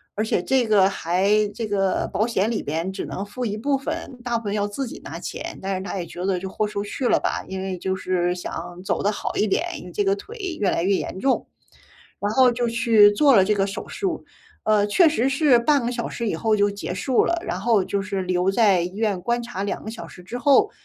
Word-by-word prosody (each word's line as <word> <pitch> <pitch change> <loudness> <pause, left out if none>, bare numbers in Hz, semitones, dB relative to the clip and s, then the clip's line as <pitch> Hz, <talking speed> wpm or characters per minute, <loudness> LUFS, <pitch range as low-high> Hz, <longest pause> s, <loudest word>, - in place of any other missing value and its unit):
而 215 - 0
且 220 - 0
这 260 -3 +2
个 200 -3 +5
还 185 +2 0 0.2
这 230 - -3
个 195 -2 0
保 215 +4 +1
险 225 -1 0
里 220 - -1
边 165 +5 -2
只 - - -5
能 195 - -5
付 245 +4 -5
一 210 -1 -2
部 275 +4 +1
分， 265 -1 -5
大 240 -1 0
部 225 - -7
分 200 - -2
要 205 -1 0
自 260 +7 -4
己 - - -8
拿 - - -7
钱。 - - -6
但 195 0 -2
是 185 - -3
他 195 - -5
也 175 - -3
觉 175 +2 -7
得 190 -2 +1
就 190 - -5
豁 215 +2 -1
出 205 -1 -3
去 245 +5 -2
了 - - +3
吧， - - -1
因 190 0 -5
为 190 -1 -3
就 190 +2 -2
是 180 -1 0
想 180 0 -7
走 - - -1
得 205 - +2
好 - - -4
一 215 - +2
点， 260 - +1 0.2
因 - - -11
为 - - -9
这 410 - 0
个 395 0 +2
腿 415 +3 -11 0.2
越 195 - +2
来 170 - 0
越 195 +1 +3
严 190 - -4
重。 270 - +1 0.7
然 205 - 0
后 255 0 +5
就 240 0 -1
去 230 -3 +5
做 275 +4 +5
了 195 - +7
这 210 +2 +2
个 195 -1 +1
手 195 - -6
术， 385 -5 -3 0.4
呃， 210 -1 +3
确 325 - +5
实 265 -5 +1
是 275 -3 +4
半 280 +2 +3
个 - - 0
小 235 -1 -3
时 235 -2 -3
以 - - -1
后 220 -2 +1
就 205 0 +3
结 200 -3 -5
束 240 +7 +1
了。 340 - +1
然 180 - -2
后 220 -3 +3
就 200 0 -2
是 200 -1 -3
留 180 +1 +1
在 195 -4 +4
医 180 +3 -5
院 210 -4 0
观 240 +3 0
察 230 -5 -5
2 200 - -3
个 220 - -5
小 225 - -8
时 180 - -13
之 230 +7 -6
后， 290 - +4
210 Hz, 275 characters per minute, -23 LUFS, 190-240 Hz, 0.7 s, 了